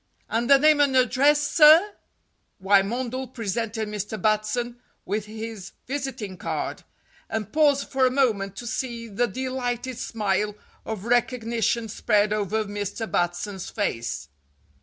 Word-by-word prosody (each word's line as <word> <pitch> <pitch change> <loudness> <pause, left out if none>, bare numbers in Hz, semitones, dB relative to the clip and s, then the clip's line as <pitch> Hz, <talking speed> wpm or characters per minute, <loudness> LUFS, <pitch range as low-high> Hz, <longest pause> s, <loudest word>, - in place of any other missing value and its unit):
And 235 +3 -1
the 275 - +8
name 305 +1 +4
and 280 -2 +3
address, 280 +4 +4
sir?" 325 +7 +7 0.7
Wymondel 230 +7 +1
presented 220 0 -2
Mr. 210 +1 -4
Batson 215 +4 0 0.3
with 210 +2 -2
his 220 -2 -7
visiting 260 -8 -4
card, - - -4 0.5
and 220 -2 -4
paused 290 -3 +3
for 265 -1 +2
a - - +2
moment 220 -8 +1
to 240 - -7
see 235 -1 -4
the 230 +3 0
delighted 255 +1 -3
smile 210 -2 -1 0.3
of 220 -2 -5
recognition 235 -1 +1
spread 210 0 +1
over 215 +1 -1
Mr. 205 +2 -4
Batson's 175 +2 -2
face. 115 - -3
225 Hz, 125 wpm, -25 LUFS, 205-255 Hz, 0.7 s, the